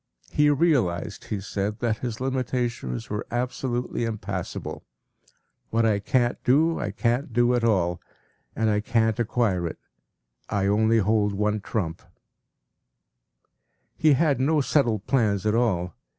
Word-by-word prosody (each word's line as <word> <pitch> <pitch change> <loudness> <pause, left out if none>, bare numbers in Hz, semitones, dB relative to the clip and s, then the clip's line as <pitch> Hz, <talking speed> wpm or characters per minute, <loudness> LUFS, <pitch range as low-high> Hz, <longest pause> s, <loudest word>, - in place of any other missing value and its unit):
He 150 0 +4
realized, 135 - +1
he 105 - -3
said, 100 +2 -3
that 115 -3 -1
his 120 -3 -4
limitations 125 - -2
were 105 +1 -3
absolutely 125 0 -2
impassable. 105 -5 -4 0.9
“What 115 0 +2
I 105 -2 +2
can’t 120 +3 +1
do, 160 +6 +3
I - - -2
can’t 120 +4 -1
do 120 +1 +3
at 120 -1 +1
all, 90 -6 +1 0.5
and 110 -1 +1
I 105 - +2
can’t 115 +1 +1
acquire 105 -6 +1
it. 80 - -6 0.7
I 100 -1 0
only 110 +3 +3
hold 105 -1 +2
one 105 +1 0
trump.” 85 -6 -3 1.9
He 155 -2 +4
had 140 -2 +2
no 150 +4 +2
settled 120 -7 +1
plans 105 -7 +1
at 105 - +2
all. 95 -8 +1
115 Hz, 135 wpm, -25 LUFS, 105-125 Hz, 1.9 s, He